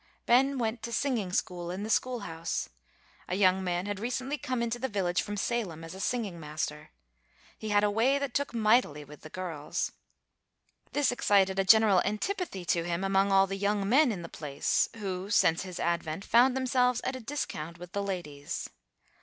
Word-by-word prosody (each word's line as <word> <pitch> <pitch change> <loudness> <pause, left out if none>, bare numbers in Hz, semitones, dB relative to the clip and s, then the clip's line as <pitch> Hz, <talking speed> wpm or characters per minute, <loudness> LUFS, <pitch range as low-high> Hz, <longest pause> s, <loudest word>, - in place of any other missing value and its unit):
Ben 270 +3 +4
went 230 -1 -1
to 235 - -5
singing 230 -6 -1
school, 175 -2 -2
in 185 +3 -4
the 215 - -4
school 250 -1 +1
house. 165 -3 -4 0.6
A 180 - -1
young 190 -1 +3
man 175 0 -1
had 205 -1 -3
recently 255 +5 -2
come 255 -3 -2
into 235 +1 -2
the 265 +2 -2
village 180 -4 0
from 205 0 -5
Salem, 195 -7 -2
as 165 - -8
a 190 - -9
singing 205 -6 -2
master. 150 -1 -4 0.7
He 215 - -6
had 205 0 +3
a 205 - +3
way 240 +6 +3
that 280 -3 -3
took 285 0 0
mightily 215 - +2
with 150 +1 -13
the 155 - -10
girls. 165 -5 -3 1.0
This 290 -3 +2
excited 195 -5 +3
a - - +4
general 205 -1 +6
antipathy 215 - -3
to 170 0 +1
him 170 +2 -2
among 195 +1 +2
all 195 0 +6
the 195 0 -4
young 200 0 0
men 265 +4 +5
in 185 -5 -5
the - - -6
place, 145 -4 0
who, 195 -3 -4
since 165 -4 +3
his 185 -2 -7
advent, 170 +1 -2
found 250 +3 +4
themselves 250 -2 +2
at 260 - -2
a - - -5
discount 215 - -4
with 175 0 -10
the 200 - -2
ladies. 170 -8 -5
200 Hz, 190 wpm, -29 LUFS, 175-240 Hz, 1.0 s, general